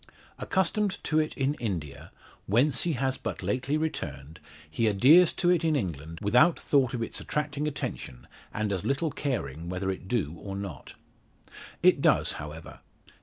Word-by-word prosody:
Accustomed 195 +2 0
to 155 - +1
it 155 - -2
in 135 +1 +1
India 85 - -4 0.4
whence 125 +7 +3
he 170 - +1
has 130 0 -1
but - - -5
lately 130 +4 0
returned 80 - -4 0.3
he 95 +9 0
adheres 140 - +6
to 175 -1 +2
it 175 -2 +2
in 160 -2 +2
England 80 - -4
without 125 - +4
thought 130 -4 +2
of 115 - -2
its - - -4
attracting 150 0 -2
attention 65 - -5 0.3
and 105 -2 -1
as 95 - -3
little 140 +3 0
caring 85 - -3
whether 95 +1 -2
it 95 0 -7
do 95 -10 -1
or 100 -1 -6
not. 95 -9 -7 0.9
It - - +5
does, - - +3
however. 75 +2 -9
120 Hz, 160 wpm, -28 LUFS, -, 0.9 s, adheres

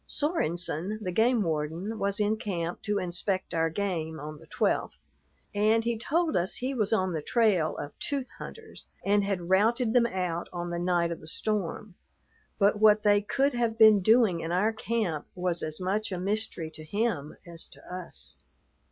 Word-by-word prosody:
Sorenson, 185 - -1
the 185 -4 -3
game 225 +3 +3
warden, 165 +7 -2
was 200 +1 -1
in 210 +1 +1
camp 175 -5 -3
to 210 -1 -1
inspect 185 +1 -2
our 165 -1 +2
game 160 -4 -3
on 150 +1 -7
the 160 - -16
12th, - - 0 0.6
and 215 +2 +3
he 235 0 0
told 315 +8 0
us 175 +2 +1
he 260 +2 -2
was 215 -6 0
on 185 -4 +1
the 155 - -2
trail 195 -5 +2
of 145 - -5
tooth 275 -3 -2
hunters 450 -1 -9 0.2
and 205 +1 +3
had 190 -4 -2
routed 225 +4 +3
them 240 -2 +5
out 180 -5 -3
on 175 -1 -4
the 170 - -2
night 175 -1 +1
of 170 - -4
the 155 - -12
storm; 205 +2 -2 0.6
but 205 0 +3
what 215 0 +5
they 205 -1 +5
could 275 +7 +1
have 235 -2 0
been 215 -2 +8
doing 220 -3 +4
in 165 0 -4
our 205 +6 +2
camp 215 -8 -2
was 180 -2 -1
as 155 0 -4
much 205 +4 -1
a 185 - -2
mystery 195 -4 -2
to 155 - -11
him 175 -4 -2
as 170 -1 -9
to - - -15
us. 180 -1 -8
195 Hz, 180 wpm, -28 LUFS, 170-220 Hz, 0.6 s, been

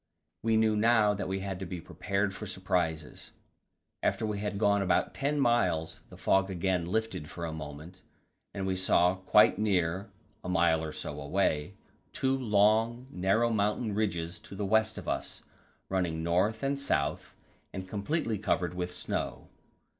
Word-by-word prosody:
We 110 0 +2
knew 110 -1 +3
now 105 -1 +4
that 100 - -3
we 95 +1 -2
had 95 -1 -4
to 95 - -4
be 90 0 -5
prepared 95 +4 -2
for 105 +2 -7
surprises. 90 -5 -2 0.7
After - - 0
we 105 -1 -2
had 105 0 -3
gone 100 -1 +3
about 95 -2 +1
ten 145 +1 -1
miles 95 - +1
the - - -12
fog 95 0 +2
again 90 -1 0
lifted 110 -6 -2
for 85 - -5
a 80 - -4
moment, 80 +4 -8 0.5
and 100 -1 -4
we 95 -1 0
saw 90 -1 +3
quite 95 +2 +4
near 95 -2 0 0.3
a - - -5
mile 85 -3 +3
or 80 - -4
so - - -6
away 80 +2 0 0.4
two 135 0 +1
long, 115 0 +2
narrow 100 +6 +2
mountain 105 +1 0
ridges 85 -5 -2
to - - -11
the 100 +1 -2
west 110 +2 +2
of - - -7
us, - - -3 0.4
running 85 -4 -1
north 95 +7 +1
and 140 0 0
south, 75 - -1 0.4
and 95 0 -6
completely 110 - -1
covered 90 -4 0
with 90 0 -3
snow. - - -4
95 Hz, 160 wpm, -30 LUFS, 90-110 Hz, 0.7 s, now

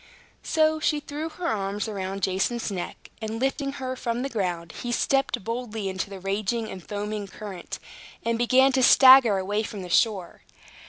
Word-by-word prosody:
So 315 0 +2
she 310 -1 +1
threw 295 +2 -5
her 340 +3 -7
arms 205 -2 -2
around 195 -2 -4
Jason's 195 +5 0
neck; 180 -3 -6
and 220 +1 -4
lifting 275 +1 -1
her 260 -2 -4
from 240 -1 -2
the 275 - -2
ground, 175 -8 -2
he 240 - -3
stepped 260 -2 +1
boldly 225 -3 -3
into 190 +1 -3
the 195 -1 -8
raging 215 +4 -2
and 185 -2 -8
foaming 205 +3 -4
current, 195 -2 -8 0.5
and 230 0 +1
began 255 +3 +4
to 260 0 +2
stagger 260 -4 +8
away 205 +3 -1
from 205 -3 -6
the 180 - -8
shore. 190 -2 +1
220 Hz, 170 wpm, -25 LUFS, 195-260 Hz, 0.5 s, stagger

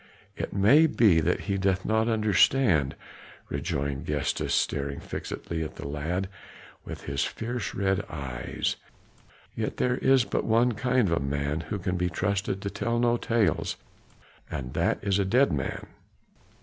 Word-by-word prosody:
"It - - -4
may 130 +12 +5
be 105 - +4
that 85 +3 +1
he 100 -2 -2
doth 95 -1 +1
not 110 +1 +2
understand," 110 - +3 0.5
rejoined 70 +3 -2
Gestas, 75 -2 -1
staring 70 0 0
fixedly 80 -1 -5
at 80 - -5
the - - -6
lad 80 +6 -2 0.6
with - - -8
his 70 -1 -1
fierce 120 +1 -4
red 95 0 +1
eyes; 65 -5 -3 0.8
"yet - - -3
there 125 0 +1
is 130 -2 +4
but - - -1
one 115 +2 +3
kind 125 0 +1
of 85 -1 +1
a 70 - -1
man 70 +2 -1
who 105 - -1
can 90 -1 -2
be 90 0 0
trusted 95 +2 -1
to 100 - -1
tell 115 +4 -1
no 120 0 +3
tales, 115 -2 0 0.7
and 65 -1 -5
that - - +1
is 100 0 +1
a - - +3
dead 120 - +3
man. 65 -3 -3
95 Hz, 155 wpm, -27 LUFS, 75-115 Hz, 0.8 s, may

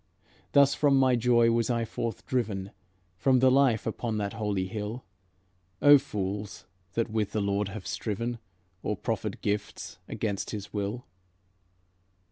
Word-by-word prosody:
Thus 140 -1 +6
from 145 -2 +3
my 130 -1 +4
joy 120 -1 +4
was 115 0 +1
I 115 -1 +1
forth 115 +1 -4
driven, 100 -6 -2 0.5
From 130 +3 +4
the 130 +1 +5
life 130 -5 +3
upon 110 0 -2
that 100 -1 -2
holy 105 -4 -1
hill. 105 +4 -5 0.7
Oh, 145 0 +8
fools, 100 -6 -4 0.3
that 115 +1 -1
with 110 -2 -1
the 110 - 0
Lord 100 0 0
have 100 -1 -7
striven, 115 +5 -3 0.4
Or - - -2
proffered - - -3
gifts 100 -4 -3
against 105 -3 -3
his 105 -2 -6
will! 105 +4 -3
110 Hz, 140 wpm, -28 LUFS, 100-120 Hz, 0.7 s, Oh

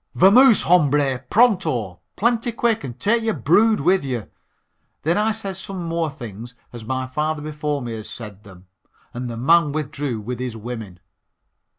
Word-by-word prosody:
Vamoos, 225 +6 +6
hombre, 145 -6 +3
pronto 165 - +2 0.2
plenty 235 +2 +1
quick 230 -3 0
and 125 -2 -7
take 230 - +2
your 225 -1 -1
brood 205 - +3
with 185 +4 +2
you." 125 -5 -4 0.7
Then 165 +3 +2
I 215 +2 +2
said 200 -4 -5
some 190 -1 -6
more 165 -1 -1
things 120 -4 -9 0.2
as 120 -2 -8
my 130 +3 -2
father 150 +3 -2
before 150 -2 -3
me 120 - -5
had 110 -1 -7
said 105 -3 -9
them, 95 -2 -15 0.5
and 125 0 -5
the 115 - -6
man 155 +4 +3
withdrew 145 -5 -3
with 120 +3 -6
his 125 -3 -4
women. 110 -5 -8
145 Hz, 165 wpm, -21 LUFS, 120-190 Hz, 0.7 s, Vamoos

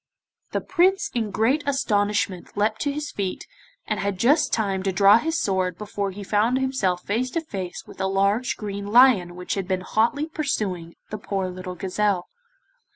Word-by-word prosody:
The - - -2
Prince 380 +2 +2
in 225 -3 -1
great 225 +9 +1
astonishment 205 -8 0
leapt 215 +1 +1
to 285 - 0
his 295 +1 -4
feet, 195 -2 -4 0.4
and 215 - -2
had 200 -2 -2
just 270 - +3
time 195 -4 0
to 195 0 0
draw 200 +4 +6
his 325 +5 -1
sword 185 - 0
before 205 -1 -3
he 200 +2 -8
found 215 +5 +2
himself 235 -10 0
face 235 +5 -1
to 330 - -2
face 190 - -6
with - - -10
a 190 - +1
large 200 +5 +1
green 200 -1 -5
lion 210 -6 +5
which 180 0 -4
had 195 -2 -3
been 185 -1 -1
hotly 235 +10 +1
pursuing 210 - -3 0.2
the 215 - -4
poor 195 -2 -2
little 185 0 -7
gazelle. 190 0 -1
205 Hz, 175 wpm, -24 LUFS, 190-250 Hz, 0.4 s, draw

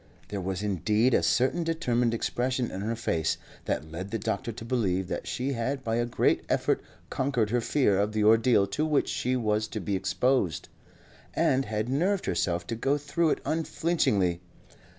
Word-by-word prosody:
There 100 -2 -3
was 95 +1 -3
indeed 105 +5 +2
a - - +4
certain 135 +7 +2
determined 125 -8 +1
expression 125 +1 -1
in 95 - -5
her 115 +3 -1
face 80 -8 0 0.3
that 80 +1 -2
led 95 +4 -5
the 115 - -2
doctor 115 +2 -2
to 110 +1 -9
believe 95 -7 0
that - - -4
she 135 +3 -2
had 130 +3 -2
by 115 -1 0
a 120 0 0
great 120 - +1
effort - - +1 0.3
conquered 125 -6 0
her 120 0 +2
fear 115 -6 +2
of 105 +1 +1
the 105 0 0
ordeal 110 -1 +5
to 150 +9 -2
which 155 -2 +1
she 125 +1 0
was 110 -3 0
to 110 - -5
be 100 +1 -2
exposed, 95 - 0 0.7
and 135 +1 +2
had 105 +1 -2
nerved 180 +10 +1
herself 85 0 0
to 115 - -3
go 135 +5 +1
through 150 +3 0
it - - 0
unflinchingly. 155 - +1
115 Hz, 180 wpm, -28 LUFS, 100-130 Hz, 0.7 s, ordeal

